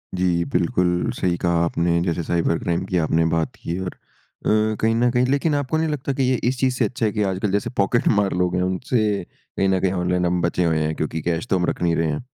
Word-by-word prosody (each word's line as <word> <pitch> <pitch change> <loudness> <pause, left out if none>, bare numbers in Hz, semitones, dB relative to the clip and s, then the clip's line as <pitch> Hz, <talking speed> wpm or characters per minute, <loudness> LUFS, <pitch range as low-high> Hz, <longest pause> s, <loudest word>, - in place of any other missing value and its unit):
जी। 90 -2 +1
बिल्कुल 90 -1 +1
सही 90 -1 +1
कहा 85 -1 +1
आपने 85 0 +1
जैसे 85 -1 -1
साइबर-क्राइम 85 +1 0
की 95 -1 -1
आपने 80 0 +2
बात 80 -1 -1
की 85 +1 -5
और 95 -1 -3 0.6
अ, 110 0 +2
कहीं 110 0 +3
न 120 +1 +3
कहीं 125 +1 +2
लेकिन 140 +3 +1
आपको 145 +2 -1
नहीं 160 0 +1
लगता 140 -2 -2
कि 135 - 0
ये 130 0 +2
इस 130 -1 -3
चीज़ 130 -1 +1
से - - +1
अच्छा 120 -2 -2
है 105 - +1
कि 105 -1 -1
आजकल 95 +2 -2
जैसे 100 +1 0
पॉकेटमार 100 -1 +2
लोग 90 0 0
हैं 90 - +1
उनसे 100 +3 0
कहीं 95 +2 -4
न 95 -1 +2
कहीं 95 - +1
ऑनलाइन 90 -1 0
हम 90 0 +1
बचे 85 +1 0
हुए 80 -1 +1
हैं 75 0 -1
क्योंकि 80 +1 -3
कैश 85 +6 -2
तो - - +1
हम 90 - +1
रख - - -3
नहीं 85 -1 +2
रहे 80 0 +1
हैं? 75 - -4
90 Hz, 240 wpm, -22 LUFS, 85-110 Hz, 0.6 s, कहीं